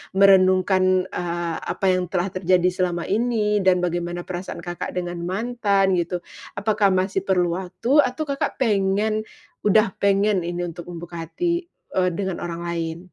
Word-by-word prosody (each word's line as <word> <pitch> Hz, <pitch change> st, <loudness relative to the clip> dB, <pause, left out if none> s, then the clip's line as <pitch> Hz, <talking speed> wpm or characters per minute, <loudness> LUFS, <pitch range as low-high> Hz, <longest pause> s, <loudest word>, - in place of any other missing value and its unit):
merenungkan, 185 Hz, -1 st, +4 dB
eee, 170 Hz, -1 st, -3 dB
apa -, -, -4 dB
yang 185 Hz, -1 st, 0 dB
telah 180 Hz, +1 st, -1 dB
terjadi 185 Hz, -1 st, +2 dB
selama 180 Hz, -2 st, -1 dB
ini 210 Hz, -1 st, +1 dB
dan 180 Hz, -1 st, +3 dB
bagaimana 175 Hz, 0 st, -2 dB
perasaan 180 Hz, +1 st, -6 dB
Kakak 175 Hz, 0 st, -5 dB
dengan 175 Hz, -1 st, -3 dB
mantan, 200 Hz, -1 st, +1 dB
gitu? 175 Hz, +1 st, -3 dB, 0.3 s
Apakah 205 Hz, 0 st, +2 dB
masih 190 Hz, +1 st, 0 dB
perlu 180 Hz, -3 st, +2 dB
waktu 230 Hz, +10 st, +1 dB
atau 255 Hz, +2 st, +2 dB
Kakak 280 Hz, -2 st, -2 dB
pengen 215 Hz, -2 st, +1 dB, 0.5 s
udah 210 Hz, 0 st, +4 dB
pengen 200 Hz, 0 st, +2 dB
ini 175 Hz, 0 st, -3 dB
untuk 175 Hz, 0 st, -7 dB
membuka 170 Hz, -1 st, -7 dB
hati, 345 Hz, -, -1 dB, 0.3 s
eee, 185 Hz, -1 st, +2 dB
dengan 190 Hz, -3 st, -3 dB
orang 170 Hz, 0 st, -5 dB
lain? 170 Hz, -1 st, -3 dB
185 Hz, 145 wpm, -23 LUFS, 175-205 Hz, 0.5 s, merenungkan